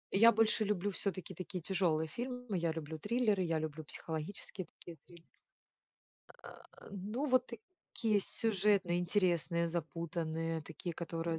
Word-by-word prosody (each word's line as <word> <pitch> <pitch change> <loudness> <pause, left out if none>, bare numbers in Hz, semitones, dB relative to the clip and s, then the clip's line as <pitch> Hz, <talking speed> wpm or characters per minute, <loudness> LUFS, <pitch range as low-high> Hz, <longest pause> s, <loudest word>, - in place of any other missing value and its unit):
я 230 +4 +9
больше 225 0 +3
люблю 205 -1 0
все-таки 190 -1 -2
такие 185 +1 -5
тяжелые 170 -3 +1
фильмы, 245 - -4
я 170 -1 +1
люблю 160 0 -5
триллеры, 215 0 +2
я 165 -2 +1
люблю 155 0 -4
психологические 160 +5 -5
такие 170 -2 -10
трил 170 -1 -15 1.2
А, - - -8 0.4
ну 210 +8 -2
вот 255 -2 +4 0.5
такие 215 -3 +3
сюжетные, 195 -4 +2
интересные, 175 -2 +2
запутанные, 165 -1 -2
такие, 165 +3 -6
которые 165 -1 -2
175 Hz, 125 wpm, -35 LUFS, 165-205 Hz, 1.2 s, я